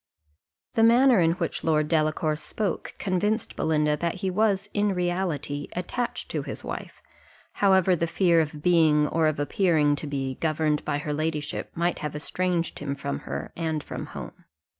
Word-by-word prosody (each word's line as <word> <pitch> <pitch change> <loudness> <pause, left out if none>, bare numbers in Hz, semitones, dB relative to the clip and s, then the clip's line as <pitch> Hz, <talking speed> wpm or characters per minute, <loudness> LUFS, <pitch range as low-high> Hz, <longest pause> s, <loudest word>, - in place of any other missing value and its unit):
The 225 - +2
manner 240 +1 +6
in 165 -1 +4
which 170 -2 -3
Lord 155 -2 +2
Delacour 155 -1 +1
spoke 195 +5 -3
convinced 205 +4 -1
Belinda 150 -1 +1
that 170 +2 -1
he 190 0 -2
was 200 0 +1
in 205 -1 +1
reality 175 -5 -2
attached 235 +7 -3
to - - -1
his - - -6
wife, - - -7 0.6
however 190 -2 +5
the 170 0 -1
fear 170 0 +3
of 150 -1 -5
being, 155 -4 +4
or 160 0 +2
of 155 -2 -1
appearing 150 -1 +2
to 150 - -5
be, 135 -2 -3
governed 155 -1 +1
by 145 - -1
her 150 0 -3
ladyship 155 0 -2
might 170 +1 0
have 150 -1 -4
estranged 175 +2 -1
him 140 -1 -3
from 140 0 -4
her, - - -5
and 160 -2 -2
from - - -6
home. - - -9
165 Hz, 165 wpm, -26 LUFS, 150-185 Hz, 0.6 s, manner